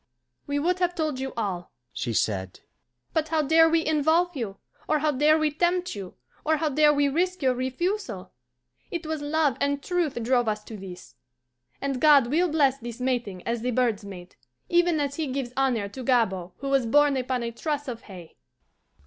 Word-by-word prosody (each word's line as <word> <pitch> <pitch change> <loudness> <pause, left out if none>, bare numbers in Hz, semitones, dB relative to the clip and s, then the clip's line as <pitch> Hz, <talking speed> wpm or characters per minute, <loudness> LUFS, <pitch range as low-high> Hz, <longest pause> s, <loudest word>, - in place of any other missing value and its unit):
"We 285 0 -1
would 355 +5 +1
have 355 -1 +1
told 310 -5 -1
you 265 0 -3
all," 190 -6 -3 0.2
she 120 - -3
said, 95 -4 -1 0.5
"but 315 -1 +1
how 315 -1 +1
dare 325 +3 +5
we 325 0 +2
involve 315 +3 +2
you, 215 -7 -4 0.3
or 310 - +2
how 305 +1 +1
dare 300 +3 +4
we 310 -1 +1
tempt 355 +3 0
you, 195 -3 -8 0.3
or 315 0 +2
how 310 0 0
dare 300 +1 +5
we 285 -1 +2
risk 360 +4 -1
your 260 -1 +3
refusal? 260 - -3 0.6
It 340 -1 -4
was 315 -1 -3
love 290 -3 +1
and 280 0 0
truth 350 -5 -1
drove 245 0 +2
us 210 0 -1
to 220 - -9
this; 180 - -10 0.6
and 275 -2 -3
God 285 -5 +6
will 345 +4 +2
bless 280 -4 +2
this 235 0 -7
mating 240 -8 -2
as 235 0 -2
the 250 - -1
birds 235 -4 +1
mate, 185 -3 -10 0.3
even 345 -2 +3
as 285 -1 -2
He 315 -2 -1
gives 260 -2 -4
honour 255 -6 +1
to 255 +6 -8
Gabord 190 -8 +1
who 275 - -5
was 270 -4 +2
born 290 +3 +4
upon 255 -1 -1
a 235 - -3
truss 290 +4 -3
of 235 -3 -5
hay." 175 -4 -11
275 Hz, 190 wpm, -26 LUFS, 235-310 Hz, 0.6 s, God